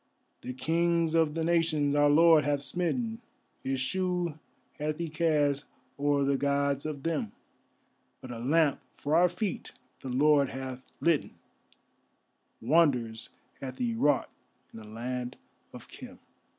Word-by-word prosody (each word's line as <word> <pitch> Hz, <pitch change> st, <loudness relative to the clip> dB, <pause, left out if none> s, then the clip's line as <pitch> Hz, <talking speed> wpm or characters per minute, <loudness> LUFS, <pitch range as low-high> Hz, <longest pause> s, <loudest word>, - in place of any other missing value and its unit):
The 125 Hz, -, -6 dB
Kings 165 Hz, +4 st, +1 dB
of 160 Hz, -2 st, +2 dB
the 165 Hz, -, -1 dB
Nations 160 Hz, -4 st, +2 dB
our 145 Hz, 0 st, +4 dB
Lord 160 Hz, +1 st, +6 dB
hath 145 Hz, -1 st, 0 dB
smitten, 225 Hz, -, -2 dB, 0.4 s
His 135 Hz, 0 st, -2 dB
shoe 175 Hz, +2 st, -1 dB, 0.4 s
hath 150 Hz, +1 st, -2 dB
He 170 Hz, -1 st, -3 dB
cast 150 Hz, -3 st, +1 dB, 0.3 s
o'er 145 Hz, 0 st, +2 dB
the 140 Hz, 0 st, +2 dB
Gods 140 Hz, +1 st, 0 dB
of 145 Hz, -3 st, -6 dB
them, 155 Hz, -11 st, -2 dB, 0.9 s
But 130 Hz, -, -9 dB
a 115 Hz, -, -6 dB
lamp 145 Hz, +4 st, +2 dB, 0.2 s
for 150 Hz, +2 st, -1 dB
our 175 Hz, +2 st, +5 dB
feet 185 Hz, +3 st, -4 dB, 0.3 s
the 135 Hz, -, -7 dB
Lord 140 Hz, +2 st, +3 dB
hath 130 Hz, -1 st, -6 dB, 0.2 s
litten, 165 Hz, -3 st, +1 dB, 1.3 s
Wonders 125 Hz, -5 st, +2 dB, 0.3 s
hath 130 Hz, -1 st, -7 dB
he 240 Hz, -2 st, -1 dB
wrought 145 Hz, -, +1 dB, 0.4 s
in -, -, -9 dB
the 110 Hz, -, -12 dB
Land 125 Hz, +3 st, -5 dB, 0.4 s
of -, -, -11 dB
Khem. -, -, -11 dB
145 Hz, 135 wpm, -29 LUFS, 135-165 Hz, 1.3 s, Lord